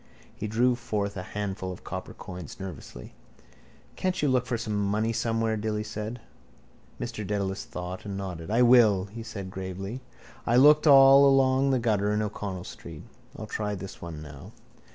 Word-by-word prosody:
He - - -4
drew 120 +4 +2
forth 105 -4 -3
a 95 - -4
handful 95 -1 -4
of 90 - -10
copper - - -6
coins, 90 -2 -9
nervously. 95 -7 -9 0.8
—Can't 185 0 -1
you 145 - +2
look 125 -1 +1
for 120 - -1
some 110 -1 -4
money 105 +3 0
somewhere? 115 -1 0
Dilly 105 0 -2
said. 110 +2 -5 0.8
Mr - - -5
Dedalus 100 -1 -2
thought 90 -5 -6
and 100 -1 -5
nodded. 90 -3 -6
—I 115 +3 +4
will, 115 -6 +5
he 110 +3 -9
said 100 -5 -7
gravely. 95 +6 -6 0.4
I 120 - +1
looked 150 +4 +6
all 135 0 +8
along 135 0 +4
the 135 - +3
gutter 105 -4 +1
in 105 0 +1
O'Connell 100 -3 -5
street. - - -10 0.3
I'll - - -6
try 105 -1 -3
this 95 0 -9
one 80 -3 -7
now. 75 +8 -11
105 Hz, 170 wpm, -27 LUFS, 95-120 Hz, 0.8 s, all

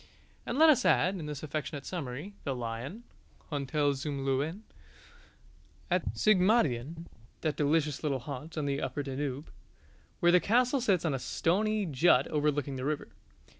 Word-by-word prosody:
And 240 - -2
let 315 +1 +8
us 275 - +2
add, 185 +2 +3
in 155 - -6
this 150 -1 -6
affectionate 150 -1 -4
summary, 155 +2 -5
The 135 -3 -2
Lion 125 - -5 0.5
(Hotel 145 0 0
zum 140 0 -4
Löwen) 145 +8 -1 1.3
at - - 0
Sigmaringen, 170 - +2 0.4
that 155 -2 -1
delicious 150 0 +1
little 145 -4 0
haunt 145 +5 -7
on 150 - -1
the 140 0 -1
upper 145 - -3
Danube, 135 +1 -4 0.7
where 175 -2 +5
the 180 - +6
castle 250 +7 +2
sits 195 -8 +2
on 155 - +1
a 135 - -1
stony 210 +10 0
jut 140 -3 +4
overlooking 145 -2 0
the 130 - -4
river. 150 0 -2
150 Hz, 150 wpm, -30 LUFS, 140-180 Hz, 1.3 s, let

